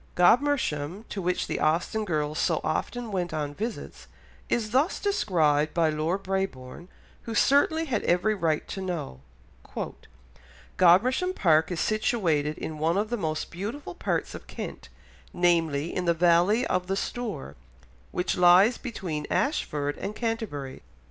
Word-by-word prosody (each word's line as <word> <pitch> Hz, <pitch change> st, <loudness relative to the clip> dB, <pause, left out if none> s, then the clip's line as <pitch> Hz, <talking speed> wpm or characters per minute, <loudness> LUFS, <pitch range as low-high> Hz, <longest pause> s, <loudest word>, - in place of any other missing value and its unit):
Godmersham, 200 Hz, -, +2 dB
to 195 Hz, -, -4 dB
which 180 Hz, 0 st, 0 dB
the -, -, -3 dB
Austen 170 Hz, +8 st, +1 dB
girls 155 Hz, -4 st, -1 dB
so -, -, +1 dB
often 230 Hz, +9 st, -2 dB
went 175 Hz, -4 st, -2 dB
on 145 Hz, -2 st, -3 dB
visits, 220 Hz, +8 st, -6 dB, 0.4 s
is 215 Hz, -3 st, 0 dB
thus 270 Hz, +8 st, +2 dB
described 155 Hz, -, +1 dB
by 165 Hz, -2 st, +3 dB
Lord 160 Hz, +6 st, -1 dB
Brabourne, 180 Hz, -6 st, -4 dB, 0.4 s
who 230 Hz, -, -4 dB
certainly 300 Hz, +7 st, +3 dB
had 245 Hz, -8 st, -1 dB
every 180 Hz, +5 st, +2 dB
right 165 Hz, -6 st, -1 dB
to 195 Hz, -, -5 dB
know— 165 Hz, -, -4 dB, 1.6 s
"Godmersham 250 Hz, -, +4 dB
Park 160 Hz, -2 st, +3 dB
is 175 Hz, -, -2 dB
situated 165 Hz, -9 st, 0 dB
in 155 Hz, -1 st, -6 dB
one 165 Hz, +4 st, +1 dB
of 215 Hz, +3 st, -1 dB
the -, -, +1 dB
most 155 Hz, -7 st, -3 dB
beautiful 215 Hz, -, -5 dB
parts -, -, -2 dB
of -, -, -10 dB
Kent, -, -, -7 dB, 0.4 s
namely, 165 Hz, -3 st, +1 dB
in 180 Hz, -, -1 dB
the 170 Hz, -1 st, +2 dB
valley 175 Hz, +7 st, +3 dB
of 180 Hz, 0 st, -1 dB
the 195 Hz, -, 0 dB
Stour, 195 Hz, -, -4 dB, 0.5 s
which 180 Hz, -, -1 dB
lies 180 Hz, +6 st, +6 dB
between 175 Hz, -, -5 dB
Ashford 145 Hz, -, -1 dB
and 205 Hz, +2 st, -4 dB
Canterbury. 220 Hz, -, -4 dB
180 Hz, 140 wpm, -27 LUFS, 155-220 Hz, 1.6 s, lies